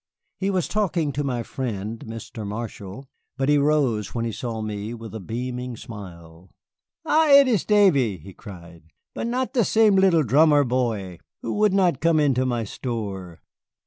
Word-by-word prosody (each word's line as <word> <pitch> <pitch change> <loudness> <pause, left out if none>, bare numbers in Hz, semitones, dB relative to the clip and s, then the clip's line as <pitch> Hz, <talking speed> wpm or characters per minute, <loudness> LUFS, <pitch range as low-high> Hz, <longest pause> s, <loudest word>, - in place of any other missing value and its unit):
He 195 - 0
was 185 -4 0
talking 175 -8 0
to 145 +1 -2
my 125 -4 -2
friend, 110 -3 -5
Mr. 115 0 -7
Marshall, 105 +2 -7 0.3
but 135 +1 0
he 145 0 +4
rose 140 -8 +1
when 115 -1 -1
he 115 - -2
saw 115 0 -5
me, 110 +1 -4
with 115 -1 -10
a 110 - -5
beaming 125 +4 -5
smile. 90 -5 -11 0.6
"Ha, 315 +1 +3
it 280 -1 +8
is 220 -8 +2
Davy," 155 - +3
he 95 +4 -13
cried, 85 -6 -12 0.3
"but - - -3
not 250 +2 -2
the 240 - +3
sem 215 0 +4
lil 190 -4 +4
drummer 145 +4 +4
boy 115 -8 -2 0.2
who 115 - -2
would 210 -2 +2
not 180 -8 +2
come 165 -1 +3
into 130 -3 +2
my 120 -2 -1
store. 100 -7 -6
125 Hz, 170 wpm, -23 LUFS, 105-160 Hz, 0.6 s, it